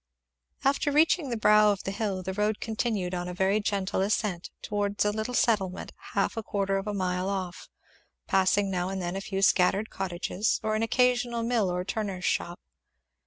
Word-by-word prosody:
After 280 +1 +2
reaching 305 0 +3
the 235 - -2
brow 210 0 +5
of 200 - -3
the 195 - -3
hill 195 -2 -2
the 190 +1 -3
road 210 +2 0
continued 215 -5 -2
on 175 0 -3
a 180 - -5
very 190 +3 +2
gentle 200 -2 -1
ascent 195 -3 -1
towards 205 0 -1
a 210 - +3
little 220 +4 -3
settlement 195 -7 0 0.2
half - - +1
a 225 - -2
quarter 195 -2 -1
of 195 - -7
a 210 - -1
mile 185 0 -1
off; 185 -2 -4 0.6
passing 195 +1 +2
now 180 0 -1
and 190 0 -3
then 175 0 -3
a 195 - -3
few 195 0 -3
scattered 195 +3 +3
cottages 190 +3 -1
or 215 - 0
an 215 - 0
occasional 245 0 +2
mill 230 -5 +1
or 180 0 -2
turner's 195 -3 -3
shop. 175 +1 -1
200 Hz, 185 wpm, -28 LUFS, 185-220 Hz, 0.6 s, brow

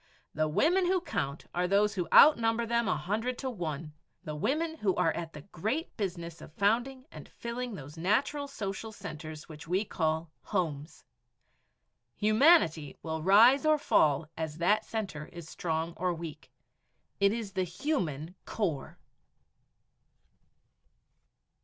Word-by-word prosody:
The 155 +1 +1
women 350 - +3
who 370 +1 +3
count 140 - -3
are 180 +1 0
those 200 +2 +3
who 180 -4 -2
outnumber 235 -5 +6
them 235 -1 +1
a - - +1
hundred 225 +6 -2
to 260 -1 -3
one 160 - -5 0.3
the 155 - -5
women 320 - -1
who 195 -3 +1
are 165 - +2
at 165 -1 -5
the 150 - -9
great 220 - -3
business 170 -5 -4
of - - -11
founding 240 +8 0
and - - -11
filling 235 -1 -5
those 150 -1 -10
natural 275 - +1
social 220 -4 -5
centers 155 -5 -8
which 155 -1 -11
we 185 +5 +1
call 160 -2 -1
homes. 160 -6 -3 1.1
Humanity 215 - +4
will 160 -1 -3
rise 225 - +6
or 310 0 +4
fall 155 - +2
as 160 -1 -4
that 205 +6 +2
center 190 -9 -4
is 170 -2 -10
strong 165 0 -2
or 180 0 0
weak. 160 -2 -8 0.7
It 200 0 +4
is 220 -3 -4
the 190 -1 0
human 175 - -2
core. 170 -11 -3
190 Hz, 140 wpm, -30 LUFS, 160-235 Hz, 1.1 s, outnumber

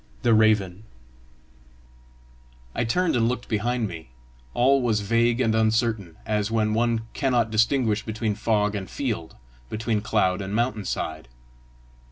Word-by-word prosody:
THE 120 -2 +4
RAVEN 105 -3 +2 1.9
I 120 - -1
turned 175 +8 +1
and 115 -1 +2
looked 125 -1 -4
behind 115 +1 0
me: 80 -7 -9 0.5
all 135 +2 +4
was 110 -4 +1
vague 115 +3 +2
and 115 -4 +2
uncertain, 110 -5 0
as 105 -1 0
when 110 -1 +1
one 115 0 +1
cannot 125 -5 +1
distinguish 110 -1 +2
between 110 -1 -2
fog 105 0 0
and 100 -3 -5
field, 110 - -4 0.3
between 110 -1 -1
cloud 105 -3 +1
and 95 +1 -4
mountain 115 -3 0
side. 80 -7 -4
110 Hz, 135 wpm, -25 LUFS, 105-120 Hz, 1.9 s, THE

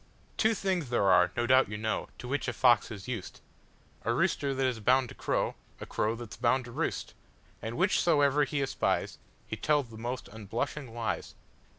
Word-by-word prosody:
Two 220 0 +3
things 185 -9 -1
there 100 -5 +3
are, 90 0 +5
no 120 - +2
doubt 130 -2 +5
you 105 - -4
know, 110 +1 -2
To 125 - -8
which 145 +3 -1
a - - -1
fox 120 -4 +4
is 105 -5 -8
used,—A 110 -6 -7
rooster 140 - +1
that 135 0 +1
is 125 -3 0
bound 125 +3 +3
to - - -9
crow,A - - -3
crow 110 +2 -1
that 115 -3 -8
's - - -10
bound 125 +2 +2
to 120 - -9
roost, - - -2 0.5
And 115 +1 -4
whichsoever 150 -5 +3
he 145 0 -1
espiesHe 135 - -1 0.4
tells 145 -6 +2
the 110 - -10
most 120 +2 -4
unblushing 115 +6 -4
lies. 115 -1 -3
125 Hz, 180 wpm, -30 LUFS, 110-140 Hz, 0.5 s, are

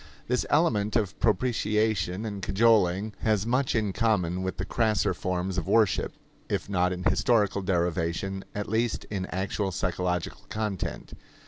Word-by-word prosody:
This - - 0
element 105 +1 +2
of 105 -5 0
propitiation 105 -3 +1
and 100 -3 -5
cajoling 105 -1 +3
has 105 -2 +1
much 125 +3 +1
in 105 -4 0
common 95 -6 +1
with 95 0 -3
the 95 - -3
crasser 110 0 +1
forms 90 0 -2
of 80 - -7
worship 110 -5 +2 0.3
if - - -1
not 90 -2 +1
in 90 0 -4
historical 105 -4 +2
derivation, 90 +1 -1
at 105 0 -3
least 115 +2 0
in 95 -3 -2
actual 95 +1 -2
psychological 90 -1 -2
content. 105 -4 -4
100 Hz, 140 wpm, -27 LUFS, 90-110 Hz, 0.3 s, cajoling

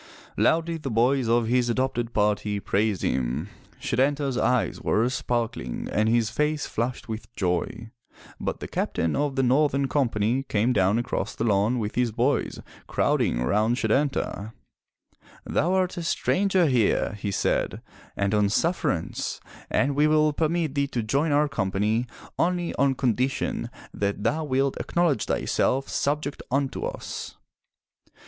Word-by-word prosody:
Loudly 165 0 +2
the 150 -4 -5
boys 120 +2 +2
of 120 0 +3
his 120 +1 +2
adopted 120 -1 -1
party 105 -1 +1
praised 100 -1 0
him. 65 +8 -1 0.3
Setanta*s 135 +2 0
eyes 125 0 +1
were 115 +3 +2
sparkling 120 - -2
and 110 +1 +2
his 115 -2 +2
face 150 0 0
flushed 120 +3 -3
with 110 0 -6
joy. 90 +5 -2 0.5
But - - -3
the - - -4
Captain 80 -1 -1
of 145 -2 0
the 135 - +2
northern 140 +1 +3
company 120 -3 +1
came 120 -2 +1
down 95 0 +3
across 120 - -2
the - - -2
lawn 105 +2 +2
with 110 -2 -2
his 125 -2 +1
boys 120 +3 0 0.3
crowding - - +1
around 105 - +2
Setanta. 130 -7 0 0.9
*Thou 170 +5 +1
art 185 -1 +1
a - - -2
stranger 185 +2 +2
here/' 125 -9 +2
he 105 0 -3
said, 100 - 0 0.4
"and 100 +1 0
on 105 -1 +3
sufferance, 160 - -1 0.3
and 140 +1 +1
we 150 +1 +4
will 155 0 +3
permit 160 -1 0
thee 140 -1 +1
to 120 -4 -2
join 140 +8 +1
our 150 +1 +3
company 105 -1 0 0.3
only 175 0 +1
on 140 -1 +2
condition 130 +1 0 0.2
that 100 0 -2
thou 155 +8 +1
wilt 135 -1 +1
acknowledge 170 -9 +1
thyself 135 +1 0
subject 145 0 -1
unto 135 +1 -1
us.' - - -6
125 Hz, 140 wpm, -25 LUFS, 110-145 Hz, 0.9 s, we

